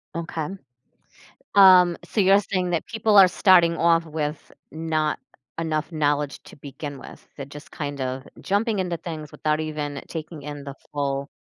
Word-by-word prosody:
Okay. 165 -2 -4 1.1
Um, 185 -3 +7
so 215 - -1
you're 195 +1 +6
saying 185 -3 -2
that 170 - -1
people 220 -2 +1
are 190 -2 +9
starting 175 -2 +4
off 165 0 +3
with 150 -1 -5 0.2
not 155 -1 -1 0.4
enough 160 0 -2
knowledge 145 -2 -1
to - - -14
begin 140 0 -8
with, - - -13
they're 140 - -7
just 145 +1 -12
kind 145 -3 -5
of 130 +1 -4
jumping 205 +2 0
into 175 -3 -2
things 155 -3 -7
without 155 0 -1
even 150 -2 -4
taking 155 -2 -7
in 145 -1 -7
the 140 -1 -7 0.2
full 140 -1 -2
155 Hz, 155 wpm, -24 LUFS, 145-180 Hz, 1.1 s, are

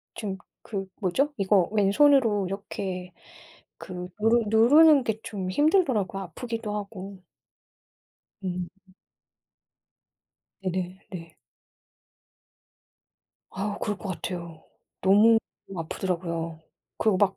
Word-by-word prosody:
지금 195 -3 -4 0.3
그 195 -3 -4
뭐죠? 265 +10 +1
이거 195 -2 +3
왼손으로 220 0 +4
이렇게 185 -1 -5 0.6
그 180 -1 -7
누르 225 +2 +4
누르는 275 +7 +6
게 220 0 -2
좀 190 -3 -4
힘들더라고요, 255 - +2
아프기도 225 +4 -5
하고. 200 -2 -7 1.2
음. 180 -1 -3 1.9
네네 185 -1 -3
네. 165 -3 -9 2.1
아, 205 +2 -3
그럴 205 -2 -2
거 205 - -7
같아요. 170 -3 -6 0.4
너무 210 +4 +6 0.4
아프더라고요. 165 -1 -3 0.4
그리고 215 -3 +3
막 195 0 +2
195 Hz, 195 characters per minute, -26 LUFS, 185-220 Hz, 2.1 s, 누르는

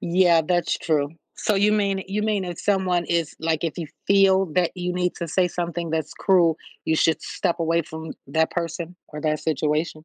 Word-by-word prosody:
Yeah, 170 -1 +4
that's 175 0 +1
true. 145 -3 0 0.3
So 215 - 0
you 205 +2 +4
mean 200 -2 +1
you 205 +2 -2
mean 210 -3 0
if 175 -2 -6
someone 185 -3 +1
is 170 -3 0
like, 160 0 0
if 165 - -1
you 170 - -4 0.2
feel 195 -1 +5
that 180 -2 +2
you 180 0 -2
need 180 0 0
to 170 - -4
say 180 +3 +1
something 170 -1 -3
that's 160 -2 -2
cruel, 175 -5 +3 0.3
you 160 - +1
should 160 0 +2
step 175 -3 -2
away 165 0 +1
from 160 0 -7 0.2
that 160 +3 +1
person 170 0 -4
or 150 0 -7
that 155 -1 0
situation? 155 0 -1
170 Hz, 195 wpm, -24 LUFS, 160-185 Hz, 0.3 s, feel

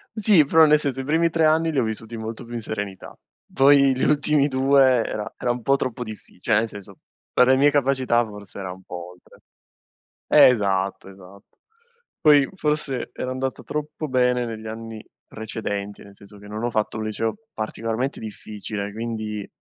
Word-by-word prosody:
Sì, 210 -7 +5
però 160 +3 +5
nel 150 0 +5
senso, 135 -3 -2
i - - -6
primi 165 +4 +2
3 165 -1 +2
anni 160 +1 +3
li 145 - 0
ho - - +2
vissuti 110 +1 -5
molto 110 0 -6
più 120 0 -11
in 120 - -3
serenità. 105 -3 -6 0.4
Poi 140 -1 +5
gli 130 - -2
ultimi 150 -1 +3
2 135 0 +3 0.2
era 105 -1 -5
era 120 - -1
un 120 0 -4
po' 135 +4 +3
troppo 125 -2 -3
difficile, 110 -5 -11
cioè - - 0
nel 110 +2 +2
senso, 100 -2 -9 0.3
per 125 - +4
le 130 - +5
mie 145 +2 +4
capacità 130 -4 +2
forse 105 -2 -10
era 95 -2 -5
un 95 +1 -12
po' 90 -1 -8
oltre. 90 0 -20 0.9
Esatto, 100 -5 +3
esatto. 95 +1 -15 0.8
Poi 145 -4 +5
forse 150 -7 -1
era 130 - -5
andata 130 0 -3
troppo 150 +1 -5
bene 125 -1 +1
negli 110 -1 -7
anni 110 0 -8 0.2
precedenti, 105 -2 -5
nel 100 0 -16
senso 100 0 -15
che 105 - -14
non 105 +2 -5
ho 120 - 0
fatto 110 -1 -1
un 110 - -3
liceo 110 +1 -2 0.2
particolarmente 115 +4 -3
difficile, 105 -1 -6
quindi 110 -2 -4
115 Hz, 180 wpm, -23 LUFS, 105-135 Hz, 0.9 s, Sì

